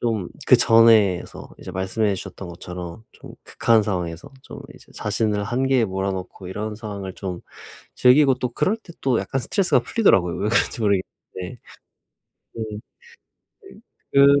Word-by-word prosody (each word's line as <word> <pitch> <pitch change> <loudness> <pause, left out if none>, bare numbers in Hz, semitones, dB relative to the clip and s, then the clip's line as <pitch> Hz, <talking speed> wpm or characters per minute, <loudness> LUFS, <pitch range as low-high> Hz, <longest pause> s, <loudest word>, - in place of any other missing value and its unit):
좀 110 -7 -1 0.2
그전에서 110 -5 +4
이제 - - -9
말씀해 95 +2 -1
주셨던 95 0 -8
것처럼 90 +4 -8
좀 - - -13
극한 115 -2 +2
상황에서 90 -5 -4
좀 - - -10
이제 - - -18
자신을 105 -2 -1
한계에 130 +2 +1
몰아 95 -1 -2
넣고 95 0 -7
이런 105 +3 -4
상황을 100 -4 -7
좀 90 -3 -6 0.5
즐기고 135 +2 +5
또 125 0 -3
그럴 150 - 0
때 205 -6 -15
또 130 -4 +1
약간 135 - -2
스트레스가 180 - +2
풀리더라고요, 95 - +2
왜 105 - -1
그런지 115 +1 +1
모르겠는데. 100 0 -3 1.0
네. 110 -1 -5 1.4
그 140 +1 +6
105 Hz, 310 characters per minute, -22 LUFS, 95-120 Hz, 1.4 s, 그